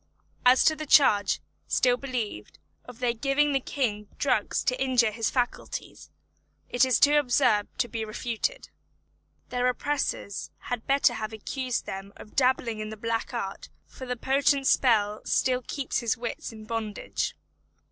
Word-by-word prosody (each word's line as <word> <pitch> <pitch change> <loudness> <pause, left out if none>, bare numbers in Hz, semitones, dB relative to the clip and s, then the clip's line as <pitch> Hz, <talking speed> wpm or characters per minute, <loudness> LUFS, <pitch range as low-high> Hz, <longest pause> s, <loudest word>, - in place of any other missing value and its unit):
As 255 +1 +6
to 315 - +4
the 310 -1 -6
charge, 205 -10 +5 0.3
still 250 -1 +3
believed, 245 - -5 0.3
of 250 -2 -11
their 245 -1 0
giving 280 +4 +1
the 270 - +3
King 215 -6 -2
drugs 245 -7 +1
to 255 +1 0
injure 250 -4 +3
his 225 0 -1
faculties, 245 -2 -3 0.6
it 245 - +3
is 255 -2 +3
too 290 +1 +6
absurd 245 -6 +2
to 245 -1 +1
be 225 0 -4
refuted. 235 - -3 0.8
Their 250 0 0
oppressors 250 -5 -2 0.2
had 245 -2 -3
better 275 -2 +4
have 220 -1 -4
accused 250 +3 -3
them 195 +1 -7
of 210 - -13
dabbling 250 -4 +2
in 215 0 -4
the 220 - -7
black 230 +3 -2
art, 200 -6 -5 0.2
for 260 - -10
the 250 0 -2
potent 275 +2 +2
spell 215 -6 +3
still 255 -1 +1
keeps 280 -3 -2
his 235 -3 0
wits 240 +1 -5
in 220 -1 -11
bondage. 220 -2 -3
245 Hz, 155 wpm, -27 LUFS, 220-265 Hz, 0.8 s, As